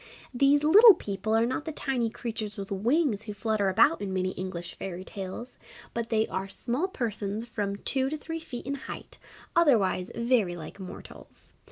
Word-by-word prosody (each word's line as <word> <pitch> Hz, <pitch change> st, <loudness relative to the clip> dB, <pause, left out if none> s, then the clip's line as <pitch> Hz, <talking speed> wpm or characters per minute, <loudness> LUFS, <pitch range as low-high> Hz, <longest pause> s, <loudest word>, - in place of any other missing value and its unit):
These 275 Hz, +3 st, +4 dB
Little 410 Hz, +7 st, +9 dB
People 205 Hz, -, -2 dB
are 225 Hz, +1 st, +4 dB
not 260 Hz, +5 st, -2 dB
the 320 Hz, -, -3 dB
tiny 260 Hz, -6 st, 0 dB
creatures 220 Hz, -2 st, -5 dB
with 195 Hz, 0 st, -6 dB
wings 235 Hz, -, +1 dB
who 210 Hz, -1 st, -7 dB
flutter 215 Hz, -2 st, 0 dB
about 185 Hz, -1 st, +4 dB
in 200 Hz, -2 st, -3 dB
many 185 Hz, 0 st, 0 dB
English 180 Hz, -2 st, -6 dB
Fairy 185 Hz, -1 st, -6 dB
tales, 195 Hz, +6 st, -7 dB, 0.3 s
but 230 Hz, -1 st, -3 dB
they 220 Hz, -1 st, +2 dB
are 190 Hz, +1 st, -3 dB
small 250 Hz, -, -1 dB
persons 220 Hz, -, -3 dB
from 205 Hz, -4 st, -3 dB
two 265 Hz, +5 st, 0 dB
to 310 Hz, -, -3 dB
three 325 Hz, +2 st, -5 dB
feet 255 Hz, -7 st, -7 dB
in 275 Hz, -, -2 dB
height, 280 Hz, -, -8 dB, 0.4 s
otherwise 220 Hz, -, +3 dB
very 235 Hz, -7 st, +2 dB
like 165 Hz, +3 st, -9 dB
mortals. 185 Hz, -1 st, -11 dB
220 Hz, 175 wpm, -28 LUFS, 195-265 Hz, 0.4 s, Little